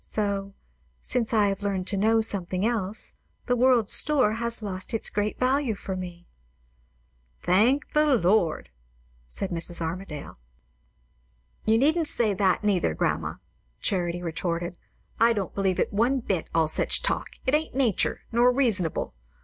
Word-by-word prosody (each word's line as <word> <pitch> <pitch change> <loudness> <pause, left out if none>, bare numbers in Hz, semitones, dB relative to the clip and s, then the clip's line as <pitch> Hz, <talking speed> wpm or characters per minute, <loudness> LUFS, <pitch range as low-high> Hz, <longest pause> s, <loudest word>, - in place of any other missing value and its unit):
So, 200 -2 -3 0.4
since 235 - -2
I 210 -3 +3
have 195 0 -3
learned 195 -2 -2
to 205 - 0
know 220 +3 +3
something 190 -2 -1
else, 220 -3 -1 0.3
the 245 - +1
world's 245 -3 +3
store 270 -8 +4
has 235 0 -3
lost 190 +1 -4
its 225 - -2
great 205 +1 -1
value 255 -2 +1
for 195 -1 -5
me." 175 -1 -7 1.2
"Thank 235 +11 +2
the 300 -2 +4
Lord!" 180 -5 +1 0.6
said 190 - -4
Mrs. 170 0 +3
Armadale. 165 - -6 1.3
"You 220 +1 +4
needn't 315 +6 +2
say 225 -7 +2
that, 190 +1 +1
neither, 180 - +1
grandma," - - -1 0.4
Charity 175 -2 -1
retorted. 170 +1 -3 0.4
"I 230 +1 +5
don't 200 -4 -3
believe 190 -2 0
it - - 0
one 240 +6 +2
bit, 195 -8 -2
all 165 -1 +2
such 155 - 0
talk. - - 0 0.2
It 260 - 0
ain't 310 -2 0
nature, 250 -8 +1
nor 240 +2 +4
reasonable. 225 - 0
205 Hz, 145 wpm, -26 LUFS, 185-235 Hz, 1.3 s, I